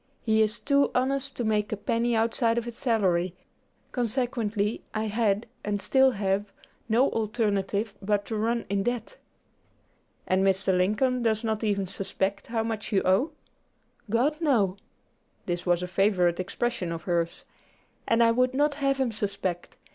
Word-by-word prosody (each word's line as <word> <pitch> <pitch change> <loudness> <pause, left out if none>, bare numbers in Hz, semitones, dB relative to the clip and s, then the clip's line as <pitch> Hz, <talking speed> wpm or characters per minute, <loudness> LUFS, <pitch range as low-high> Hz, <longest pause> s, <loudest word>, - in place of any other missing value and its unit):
He 220 -1 +3
is 215 +1 +1
too 280 0 +3
honest 270 +1 0
to 245 - -1
make 210 -1 0
a 215 - -1
penny 230 +3 0
outside 230 +1 +1
of 235 - -1
his 240 -1 -6
salary; 185 -8 +1 0.6
consequently 230 -3 -1
I 215 - 0
had, 215 -1 +1 0.2
and 205 -1 -1
still 265 +5 +4
have, 200 -2 -1 0.4
no 240 +5 +3
alternative 210 -2 -1
but 205 0 0
to 225 - -4
run 230 +2 0
in 200 0 0
debt." 240 +1 -3 1.1
"And 190 +1 +2
Mr. 190 0 +2
Lincoln 215 +8 +1
does 220 -1 +1
not 220 -1 -1
even 200 -2 +1
suspect 195 +1 -3
how 225 -1 -1
much 225 -1 -4
you 195 -2 +2
owe?" 225 - +2 0.8
"God, 255 +8 +2
no!" 220 - +2 0.7
this 175 0 -3
was 175 0 +2
a - - -3
favorite 180 -2 +2
expression 190 -1 -2
of 165 0 -5
hers 170 -2 -1 0.6
"and 230 +1 +4
I 230 - +5
would 250 +2 +2
not 290 +1 +2
have 275 -1 0
him 260 -3 +1
suspect. 200 -4 -3
220 Hz, 155 wpm, -27 LUFS, 195-240 Hz, 1.1 s, I